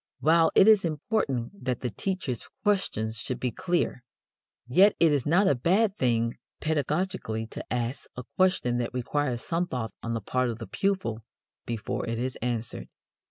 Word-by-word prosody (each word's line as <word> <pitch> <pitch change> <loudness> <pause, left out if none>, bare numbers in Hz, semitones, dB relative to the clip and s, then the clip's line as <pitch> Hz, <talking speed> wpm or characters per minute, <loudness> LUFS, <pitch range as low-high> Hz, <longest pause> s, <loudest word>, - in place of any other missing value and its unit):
While 165 +1 +4
it 195 - +7
is 215 -3 +7
important 155 - -2
that 125 -1 -1
the 125 - -2
teacher's 145 - -3
questions 115 - 0
should 125 0 -3
be 125 -1 -1
clear, 175 - -1 0.6
yet 190 - +5
it 165 -2 +5
is 145 -3 +1
not 180 +7 +4
a - - +5
bad 190 - +2
thing 115 - 0 0.2
pedagogically 155 - -1
to - - -6
ask 120 +1 -2
a 125 - -6
question 185 -10 +2
that 120 +1 -3
requires 125 -1 -1
some 175 +1 0
thought 120 -6 -3
on 115 0 -3
the - - -1
part 125 +5 0
of 115 - -4
the 115 - -7
pupil 185 - -1 0.4
before 115 -1 -3
it 115 - -2
is 130 +2 -2
answered. 120 -1 -3
130 Hz, 165 wpm, -27 LUFS, 120-180 Hz, 0.6 s, it